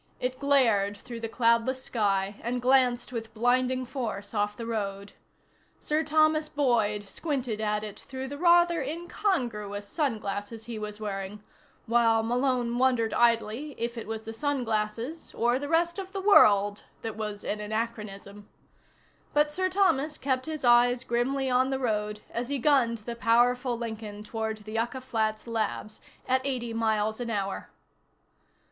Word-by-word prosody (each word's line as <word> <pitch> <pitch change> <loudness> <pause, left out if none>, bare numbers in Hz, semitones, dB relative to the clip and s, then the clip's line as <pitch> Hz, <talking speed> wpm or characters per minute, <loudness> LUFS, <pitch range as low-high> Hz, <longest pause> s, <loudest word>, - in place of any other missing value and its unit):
It 255 +1 -2
glared 230 -8 +3
through 235 +3 -8
the 225 -1 -4
cloudless 235 +3 +2
sky 200 -4 0
and 245 +1 -2
glanced 250 -1 +2
with 225 -1 -5
blinding 255 +2 +2
force 230 -6 -5
off 210 -1 0
the 230 - -5
road. 200 -3 -3 0.7
Sir 305 +1 0
Thomas 310 0 +3
Boyd 220 -7 +1
squinted 250 -4 -3
at 210 0 0
it 210 -2 -7
through 265 0 -6
the 285 +2 -6
rather 345 -1 +5
incongruous 260 - -2
sunglasses 215 -5 -3
he 230 -2 -5
was 210 0 -5
wearing, 205 0 -5 0.4
while 230 -1 +3
Malone 245 0 0
wondered 245 -4 +2
idly 235 +4 +1
if 235 +1 -2
it 230 - -6
was 220 0 -4
the 225 - -7
sunglasses, 235 +1 -2
or 240 +2 +2
the 285 +1 -5
rest 340 +3 +2
of 380 0 -7
the 395 - -2
world, 205 - +5 0.2
that 225 -2 -4
was 210 -2 -5
an 210 - -2
anachronism. 210 -2 -5 0.9
But 295 0 +3
Sir 370 +3 0
Thomas 315 -6 +2
kept 260 0 -1
his 310 -4 -4
eyes 240 +1 +5
grimly 260 +3 0
on 255 +1 +3
the 265 - 0
road 210 -4 -1
as 240 +2 -3
he 285 - 0
gunned 250 -3 +3
the 235 - -4
powerful 240 +2 +2
Lincoln 220 -3 -6
toward 220 0 -3
the 215 - -9
Yucca 235 +4 -2
Flats 220 -4 -1
Labs 215 -2 -3 0.3
at 260 +1 +2
eighty 250 -4 -2
miles 220 -1 0
an 240 -1 -3
hour. 195 -3 -3
235 Hz, 155 wpm, -28 LUFS, 215-265 Hz, 0.9 s, rather